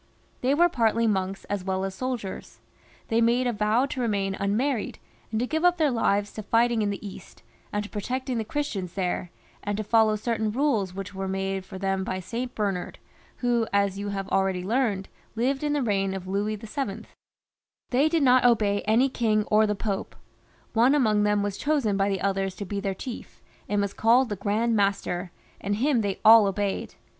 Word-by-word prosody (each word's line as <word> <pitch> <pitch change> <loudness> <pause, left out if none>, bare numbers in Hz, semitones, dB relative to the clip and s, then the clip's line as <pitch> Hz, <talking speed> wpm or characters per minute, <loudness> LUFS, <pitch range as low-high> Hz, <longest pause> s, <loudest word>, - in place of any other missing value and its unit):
They 265 +3 +2
were 345 +3 +5
partly 230 -6 +1
monks 195 -2 -1
as 205 -2 -3
weU 190 0 -1
as 195 - -4
soldiers; 240 -3 -5 0.5
they 230 +1 +2
made 240 +2 +3
a 245 - +1
vow 215 +4 +2
to 260 -2 -4
remain 200 -4 0
unmarried, 220 +5 -1 0.3
and 220 - -1
to 245 - +1
give 315 +5 -2
up 355 0 +4
their 305 -4 +2
lives 205 -3 +1
to 215 - -5
fighting 230 +2 +2
in 205 - +1
the 200 +1 -5
East, 190 -1 -12 0.3
and 205 0 -1
to 205 - -9
protecting 250 +4 -3
the - - -1
Chris 290 +7 -3
tians 185 -4 -5
there, 180 -2 -2 0.3
and 205 0 -2
to 215 - -2
follow 220 0 +3
certain 220 0 -1
rules 220 -8 0
which 195 -1 -6
were 190 0 -4
made 195 0 -2
for 190 0 -9
them 195 0 -1
by 185 0 -3
St. 240 +7 -5
Bernard, 195 -4 -2 0.5
who, 235 -2 +2
as 200 -1 +1
you 205 0 -3
have 195 -1 -3
abeady 190 -1 +1
heard, 220 -5 0 0.3
lived 265 +4 0
in 295 -1 0
the 290 -2 0
reign 195 -3 0
of 190 -1 -6
Louis 205 +3 -1
VIL 215 0 -4 0.9
They 275 +5 +3
did 325 -2 +2
not 255 -1 +5
obey 210 -4 +3
any 225 +5 +4
king 220 -5 +1
or 215 0 +5
the 210 - 0
Pope. 200 -1 -3 0.6
One 240 +5 +4
among 215 -7 +3
them 210 0 +2
was 205 -1 -3
chosen 285 -9 +1
by 195 0 +1
the 195 -2 -2
others 195 -1 -1
to 200 - -6
be 200 +1 -3
their 195 -1 -2
chief, 245 +4 -8 0.3
and 205 - +1
was 200 -1 -1
called 240 +3 +3
the 205 - -2
Grand 215 +4 0
Master, 195 -3 0 0.3
and 205 +1 -1
him 255 +2 +2
they 200 -2 -2
all 220 -1 +9
obeyed. 195 0 -2
210 Hz, 200 wpm, -26 LUFS, 195-240 Hz, 0.9 s, all